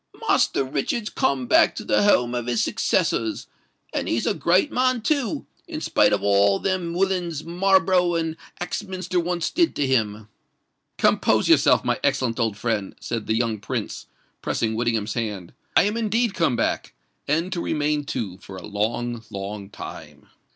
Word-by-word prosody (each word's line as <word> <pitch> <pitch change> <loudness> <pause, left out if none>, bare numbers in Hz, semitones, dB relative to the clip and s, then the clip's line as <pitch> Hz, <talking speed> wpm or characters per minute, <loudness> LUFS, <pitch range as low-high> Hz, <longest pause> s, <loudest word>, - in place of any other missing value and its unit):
"Master - - +3
Richard's 150 - -2
come 260 -1 0
back 320 +6 +4
to 220 - -5
the - - +2
home 125 -12 +3
of 120 -1 -3
his 120 -2 +1
successors; 110 -1 0 0.5
and - - -2
he's 115 - 0
a - - +2
great 175 - +2
man 255 -2 +1
too—in 275 - -3
spite - - +3
of - - 0
all 100 0 +4
that - - -3
them 180 -3 -1
willains 180 -4 0
Marlborough 185 0 +3
and 165 -1 -1 0.2
Axminster 185 0 -3
once 175 0 -1
did 340 -2 +2
to 145 - +1
him!" 110 -5 0 0.7
"Compose - - +3
yourself, - - +5
my - - 0
excellent 120 -2 0
old 110 -3 0
friend," 105 -3 -2
said 115 -3 -4
the 110 - +1
young 115 -2 0
Prince, 105 - -5 0.3
pressing 110 -1 -1
Whittingham's 110 -2 -1
hand: 105 -7 -4 0.2
"I - - +7
am 210 +2 0
indeed 225 0 +1
come 165 -8 +1
back—and 155 +8 -2
to 170 - -2
remain, 150 -1 0
too, 100 -8 -4
for 95 -1 -10
a - - -9
long—long 105 -2 -4
time." - - -10
145 Hz, 160 wpm, -23 LUFS, 110-185 Hz, 0.7 s, I